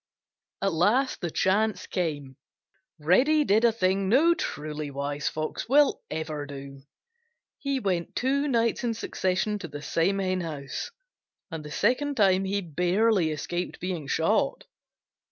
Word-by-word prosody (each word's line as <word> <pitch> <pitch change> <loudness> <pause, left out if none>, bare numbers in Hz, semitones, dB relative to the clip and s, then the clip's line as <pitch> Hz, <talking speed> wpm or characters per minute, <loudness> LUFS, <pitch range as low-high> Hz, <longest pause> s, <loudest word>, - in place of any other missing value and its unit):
At 195 -2 +1
last 225 +11 +2
the 175 - -1
chance 200 +3 +1
came. 145 -7 -3 0.6
Reddy 255 - +4
did 220 -3 +3
a 235 - +6
thing 190 -2 0
no 310 +10 +5
truly 150 - -4
wise 140 +1 -2
Fox 155 0 -4 0.4
ever 155 -1 -4
will 145 - -4
do. 140 -1 -9 0.8
He 275 -1 -1
went 185 -7 -2
two 280 +3 +1
nights 230 -4 +1
in 235 -2 0
succession 205 0 -1
to 170 - -6
the 145 -1 -8
same 170 +6 +1
henhouse, 170 -7 -3 0.6
and 160 -1 -5
the 150 - -8
second 255 - 0
time 195 -2 +4
he 200 +1 -1
barely 180 +3 +2
escaped 175 +3 -4
being 180 -6 -4
shot. - - +1
185 Hz, 135 wpm, -27 LUFS, 155-220 Hz, 0.8 s, a